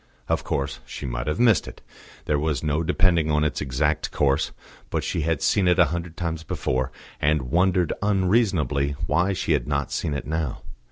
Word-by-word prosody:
Of -, -, 0 dB
course 70 Hz, 0 st, -2 dB
she -, -, -7 dB
might -, -, -3 dB
have 75 Hz, -, -1 dB
missed 120 Hz, -3 st, +4 dB
it; -, -, -10 dB, 0.5 s
there 75 Hz, -1 st, +1 dB
was 75 Hz, 0 st, -1 dB
no 75 Hz, +1 st, +1 dB
depending 85 Hz, -1 st, +2 dB
on 75 Hz, 0 st, +2 dB
its 75 Hz, -3 st, -1 dB
exact 75 Hz, +4 st, 0 dB
course; 70 Hz, +1 st, +1 dB, 0.4 s
but -, -, -1 dB
she 85 Hz, -, -1 dB
had 80 Hz, -1 st, 0 dB
seen 95 Hz, -3 st, +3 dB
it 90 Hz, -, +4 dB
a 90 Hz, -, +7 dB
hundred 85 Hz, -1 st, -5 dB
times 85 Hz, -2 st, -2 dB
before, 65 Hz, -4 st, -2 dB, 0.3 s
and 75 Hz, -4 st, +1 dB
wondered 90 Hz, -1 st, +2 dB
unreasonably 95 Hz, -8 st, +2 dB
why 90 Hz, +6 st, +2 dB
she 90 Hz, -2 st, -2 dB
had 70 Hz, -6 st, +1 dB
not 70 Hz, -2 st, -1 dB
seen 75 Hz, -, -1 dB
it 70 Hz, -, -4 dB
now. 80 Hz, -4 st, -3 dB
80 Hz, 185 wpm, -24 LUFS, 70-90 Hz, 0.5 s, a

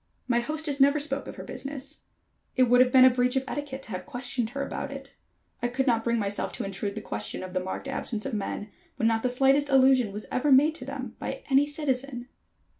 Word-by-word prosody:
My 240 Hz, -2 st, +2 dB
hostess 300 Hz, +2 st, -2 dB
never 280 Hz, +2 st, +5 dB
spoke 280 Hz, -1 st, -2 dB
of -, -, -7 dB
her -, -, -8 dB
business. 275 Hz, +1 st, -6 dB, 0.5 s
It 255 Hz, -, +5 dB
would 245 Hz, 0 st, +5 dB
have 250 Hz, 0 st, +4 dB
been 255 Hz, 0 st, +8 dB
a -, -, +9 dB
breach 250 Hz, +1 st, +1 dB
of 265 Hz, -, +1 dB
etiquette 280 Hz, -2 st, -5 dB
to -, -, -8 dB
have 185 Hz, +6 st, -5 dB
questioned 245 Hz, -4 st, -2 dB
her 275 Hz, +3 st, -3 dB
about 280 Hz, -, -4 dB
it. 275 Hz, 0 st, -9 dB, 0.5 s
I 240 Hz, -, +1 dB
could 260 Hz, +2 st, -1 dB
not 230 Hz, -4 st, +2 dB
bring 235 Hz, 0 st, +1 dB
myself 205 Hz, -2 st, -1 dB
to -, -, -3 dB
intrude 200 Hz, +1 st, -3 dB
the 215 Hz, -, -4 dB
question 105 Hz, -, -4 dB
of 185 Hz, -1 st, -8 dB
the 185 Hz, -, +1 dB
marked 190 Hz, +8 st, -5 dB
absence 230 Hz, -5 st, -2 dB
of 270 Hz, -, -3 dB
men, 205 Hz, 0 st, -4 dB, 0.2 s
when 225 Hz, -, +1 dB
not 225 Hz, 0 st, +2 dB
the 250 Hz, -, +1 dB
slightest 270 Hz, +3 st, +3 dB
allusion 260 Hz, -4 st, +5 dB
was 210 Hz, +2 st, -6 dB
ever 275 Hz, +3 st, +1 dB
made 290 Hz, +4 st, +6 dB
to -, -, -6 dB
them -, -, -6 dB
by -, -, -5 dB
any 275 Hz, +2 st, +5 dB
citizen. 270 Hz, -4 st, -3 dB
255 Hz, 230 wpm, -27 LUFS, 230-275 Hz, 0.5 s, a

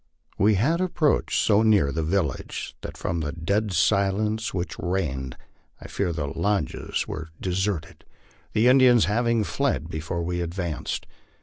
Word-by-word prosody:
We 105 Hz, +1 st, +4 dB
had 155 Hz, -, +2 dB
approached 170 Hz, -5 st, +1 dB
so 105 Hz, -1 st, +4 dB
near 105 Hz, -11 st, +4 dB
the 80 Hz, -, -1 dB
village 80 Hz, -4 st, -2 dB
that -, -, -7 dB
from 85 Hz, -, -2 dB
the 75 Hz, -2 st, -2 dB
dead 100 Hz, +6 st, -1 dB
silence 100 Hz, +4 st, +1 dB
which 90 Hz, 0 st, -4 dB
reigned 70 Hz, -9 st, -2 dB, 0.4 s
I -, -, -10 dB
feared 90 Hz, -5 st, -2 dB
the 75 Hz, -3 st, -2 dB
lodges 80 Hz, +2 st, -1 dB
were 80 Hz, +1 st, -6 dB
de 95 Hz, -, -3 dB
serted, 95 Hz, -2 st, -2 dB, 0.6 s
the 110 Hz, +2 st, +3 dB
Indians 125 Hz, -3 st, +6 dB
having 115 Hz, +1 st, +1 dB
fled 120 Hz, -, -1 dB
before 80 Hz, +2 st, -3 dB
we 90 Hz, +1 st, -2 dB
advanced. 85 Hz, -2 st, -3 dB
95 Hz, 145 wpm, -25 LUFS, 80-110 Hz, 0.6 s, Indians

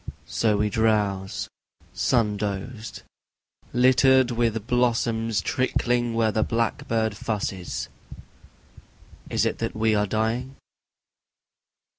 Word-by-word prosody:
So 110 Hz, -2 st, +1 dB
we 105 Hz, 0 st, 0 dB
drowse, 105 Hz, -2 st, 0 dB, 0.5 s
sun 105 Hz, +1 st, +1 dB
dozed, 105 Hz, +1 st, -5 dB, 0.7 s
Littered 130 Hz, 0 st, +4 dB
with 115 Hz, -2 st, 0 dB
blossoms 115 Hz, -3 st, +1 dB
trickling 120 Hz, -2 st, 0 dB
where 115 Hz, -1 st, +2 dB
the 110 Hz, -, 0 dB
blackbird 115 Hz, -1 st, 0 dB
fusses. 100 Hz, -4 st, -3 dB, 1.4 s
Is -, -, +1 dB
it -, -, -1 dB
that -, -, -3 dB
we 110 Hz, 0 st, +2 dB
are 105 Hz, 0 st, +2 dB
dying? 115 Hz, +6 st, -1 dB
110 Hz, 95 wpm, -25 LUFS, 105-120 Hz, 1.4 s, Littered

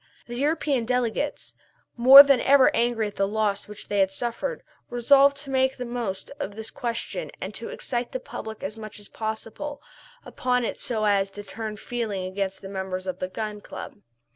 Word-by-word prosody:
The 240 Hz, -, -7 dB
European 285 Hz, -2 st, 0 dB
delegates, 250 Hz, +3 st, -1 dB, 0.4 s
more 265 Hz, +4 st, +11 dB
than 275 Hz, -3 st, +3 dB
ever 275 Hz, -1 st, +5 dB
angry 235 Hz, -2 st, +1 dB
at 205 Hz, -, -7 dB
the 195 Hz, -, +2 dB
loss 205 Hz, -1 st, -1 dB
which 210 Hz, 0 st, -10 dB
they 205 Hz, -, 0 dB
had 190 Hz, -1 st, +4 dB
suffered, 240 Hz, -, -4 dB, 0.3 s
resolved 275 Hz, +3 st, +5 dB
to 275 Hz, -1 st, -7 dB
make 265 Hz, 0 st, +2 dB
the 250 Hz, -, -4 dB
most 235 Hz, -5 st, -4 dB
of 210 Hz, -8 st, -4 dB
this 220 Hz, 0 st, -6 dB
question 245 Hz, -, -4 dB
and -, -, -5 dB
to -, -, -6 dB
excite 240 Hz, -1 st, -3 dB
the 260 Hz, -, -3 dB
public 220 Hz, -3 st, -8 dB
as 200 Hz, +3 st, -4 dB
much 215 Hz, -1 st, -9 dB
as 205 Hz, -, -11 dB
possible 225 Hz, +6 st, -5 dB, 0.5 s
upon 250 Hz, -1 st, 0 dB
it -, -, -4 dB
so 220 Hz, -3 st, -1 dB
as 200 Hz, -1 st, +2 dB
to 205 Hz, +1 st, -9 dB
turn 215 Hz, +1 st, -6 dB
feeling 215 Hz, -5 st, -3 dB
against 190 Hz, +1 st, -3 dB
the -, -, -6 dB
members 190 Hz, -1 st, -4 dB
of 185 Hz, -, -4 dB
the 185 Hz, -, -2 dB
Gun 210 Hz, +2 st, -5 dB
Club. 205 Hz, -, -9 dB
225 Hz, 190 wpm, -25 LUFS, 205-255 Hz, 0.5 s, more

